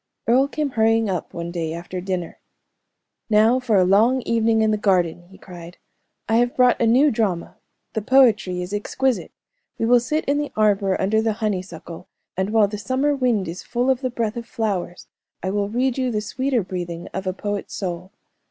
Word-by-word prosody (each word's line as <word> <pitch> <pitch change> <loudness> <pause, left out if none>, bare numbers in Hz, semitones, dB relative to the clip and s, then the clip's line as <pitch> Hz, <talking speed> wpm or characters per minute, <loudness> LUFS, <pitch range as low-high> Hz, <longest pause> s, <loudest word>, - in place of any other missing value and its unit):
Earle 255 +4 +4
came 290 0 -3
hurrying 225 -2 +2
up 180 - -4
one 170 0 -5
day 165 -2 -3
after 175 +2 -6
dinner. 185 -2 -4 0.9
"Now 220 +4 +4
for 245 -4 0
a 190 - +5
long 225 +7 +3
evening 225 -1 +2
in 220 - +2
the - - +2
garden!" 175 -4 0
he 190 - -15
cried. 175 -1 -11 0.5
"I 225 - +2
have 245 +1 +1
brought 250 -1 +3
a 230 - +3
new 265 +6 +4
drama; 200 -7 -2 0.4
the 220 - -1
poetry 215 -7 +3
is 180 +3 -7
exquisite. 255 +5 -1 0.5
We - - -1
will 245 +1 +5
sit 300 +6 -2
in 285 +1 +1
the 295 -1 -3
arbor 200 -3 +2
under 215 +3 +2
the 220 -1 0
honeysuckle, 185 -6 -5 0.3
and 190 +2 -1
while 215 -1 +4
the 205 0 -6
summer 260 +8 0
wind 245 -8 0
is 170 +3 -6
full 250 +2 0
of 260 0 -1
the 255 - -1
breath 230 -2 -2
of 235 0 -6
flowers, 200 -8 -3 0.4
I 190 - -1
will 200 0 -1
read 255 +3 0
you 255 -1 0
the 215 -3 -1
sweeter 250 +2 -1
breathing 175 -2 -5
of 190 +1 -4
a - - +1
poet's 205 +1 -4
soul. 180 -1 -5
215 Hz, 195 wpm, -22 LUFS, 185-245 Hz, 0.9 s, a